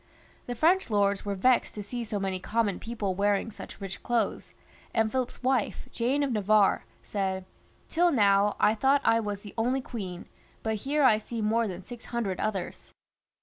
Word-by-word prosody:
The 245 - -3
French 340 +8 +3
lords 200 -2 +1
were 200 -1 -1
vexed 250 +6 +2
to 210 - -5
see 240 +4 -4
so 215 -2 -3
many 190 -1 -2
common 205 0 0
people 220 -5 -3
wearing 200 +3 +1
such - - -10
rich 195 -2 -6
clothes, 235 -4 -1 0.4
and 220 -1 +2
Philip's 255 0 -3
wife, 255 -4 0
Jane 260 +5 +1
of 275 - 0
Navarre, 210 -2 +3 0.2
said, 190 -2 -2 0.2
" - - -34
Till 345 +1 +3
now 205 -5 +4
I 210 - +5
thought 270 +5 +3
I 225 - +5
was 205 -2 -3
the 205 - -10
only 250 +4 +1
queen, 195 -9 -6 0.4
but 220 -1 0
here 295 +1 +2
I 220 -5 +6
see 230 +1 -6
more 225 +2 +1
than 185 -1 -7
six 245 -2 -10
hundred 220 -6 -2
others." 195 -4 -3
215 Hz, 185 wpm, -28 LUFS, 200-245 Hz, 0.4 s, I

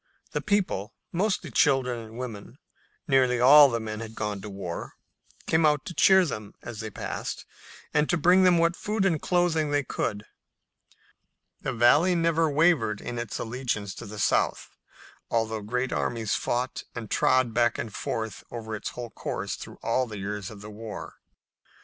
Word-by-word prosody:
The - - -2
people, 185 - -1 0.2
mostly 195 +4 0
women - - -13
and - - -26
children 125 -4 0 0.5
nearly 130 -4 +3
all 140 +3 +9
the 115 -2 -1
men 110 -1 -5
had 110 0 -8
gone 105 -2 -3
to 105 - -7
war 95 -4 -6 0.5
came 160 0 +2
out 150 -1 +3
to 175 - -6
cheer 190 +1 +6
them 105 -9 -6
as 120 -3 -7
they 110 0 -4
passed, 100 - -5 0.5
and 150 0 +2
to 175 - +2
bring 180 +4 +5
them 180 -2 +5
what 170 +1 +3
food 210 0 -1
and 165 -6 +1
clothing 175 -4 +1
they 145 0 +1
could. 105 -4 -3 1.4
The - - -2
Valley 145 +10 +4
never 165 -1 +2
wavered 145 -9 +2
in 120 - -5
its 120 -3 -4
allegiance 110 -4 -3
to 115 - -9
the 105 +1 -8
South, 105 - +1 0.6
although 110 -1 0
great 125 +5 -2
armies 115 -4 -1
fought 125 +2 -1
and 115 -3 -7
trod 130 -3 +3
back 120 0 +2
and 110 - -5
forth 110 0 -4
over 110 -2 -5
its 105 - -4
whole 120 -2 -6
course - - -4
through - - -8
all 125 +2 +1
the 110 -2 -7
years 100 0 -4
of 105 -2 -11
the 105 0 -9
war. 110 0 -8
120 Hz, 170 wpm, -27 LUFS, 110-155 Hz, 1.4 s, all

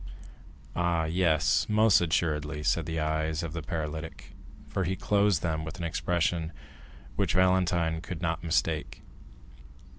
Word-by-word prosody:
"Ah, 85 -2 +1
yes, 80 -1 +2
most 105 -2 +5
assuredly," 80 -3 0
said 85 -1 +1
the 80 0 -2
eyes 80 +1 -1
of 80 -2 -5
the 80 - -4
paralytic, 80 0 -5 0.4
for 95 - -2
he 95 +2 -1
closed 100 -4 +2
them 80 -2 -1
with 80 +3 -7
an 85 - -5
expression 85 -1 0 0.6
which - - 0
Valentine 90 -3 +2
could 85 0 -6
not 85 -2 -2
mistake. 80 -2 -1
80 Hz, 130 wpm, -28 LUFS, 80-90 Hz, 0.6 s, most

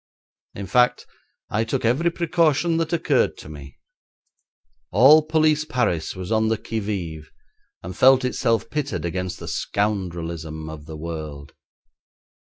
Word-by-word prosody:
In 100 - -5
fact, 125 +6 +2 0.5
I 110 +1 +1
took 115 - -2
every 135 +9 +2
precaution 170 -1 +1
that 165 0 -1
occurred 170 - +1
to - - -11
me. 70 -3 -11 1.1
All 135 - +7
police 155 -1 +2
Paris 120 - -1
was 95 +2 -6
on 110 0 +2
the 110 0 +1
qui 110 +1 -4
vive, 85 -7 -5 0.5
and 90 +1 -7
felt 130 +2 +5
itself 115 -3 0
pitted 145 -9 -3
against 90 +1 -3
the - - -9
scoundrelism 85 -6 -3
of 75 -1 -10
the 80 -1 -8
world. 75 -3 -7
105 Hz, 135 wpm, -23 LUFS, 85-135 Hz, 1.1 s, All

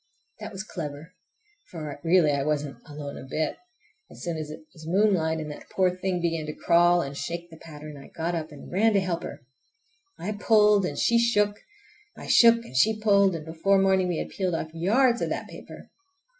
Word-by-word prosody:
That - - -7
was 195 -1 -6
clever, 160 -4 -7 0.6
for 155 -4 -7
really 165 -2 +4
I 140 -1 0
wasn't 150 -1 -2
alone 145 -1 -7
a - - -9
bit! 150 +3 -2 0.5
As - - -12
soon 170 -2 -2
as 155 -1 -5
it 155 - -9
was 160 -1 -12
moonlight, 175 -4 +2
and 155 -1 -5
that 145 - -11
poor 185 -1 +1
thing 185 -1 -2
began 165 -2 -2
to 150 - -5
crawl 175 0 +4
and 140 0 -6
shake 170 +4 -5
the 160 - -12
pattern, 150 -1 -10
I 135 - -12
got 170 +2 -3
up 160 -2 -4
and 145 - -12
ran 215 +5 +3
to 200 - +4
help 180 -3 -2
her. - - -9 0.7
I 205 - -4
pulled 210 -2 +4
and 145 - -6
she 235 0 +3
shook, 210 -3 +2 0.6
I - - -9
shook 235 0 +5
and 130 - -12
she 215 +11 +3
pulled, 200 -3 +4
and 155 -2 -6
before 165 +5 +1
morning 190 -1 +3
we 175 -2 -1
had - - -4
peeled 185 -3 -2
off 160 -1 -5
yards 235 +9 +2
of - - -1
that - - -4
paper. - - -12
170 Hz, 205 wpm, -26 LUFS, 155-195 Hz, 0.7 s, shook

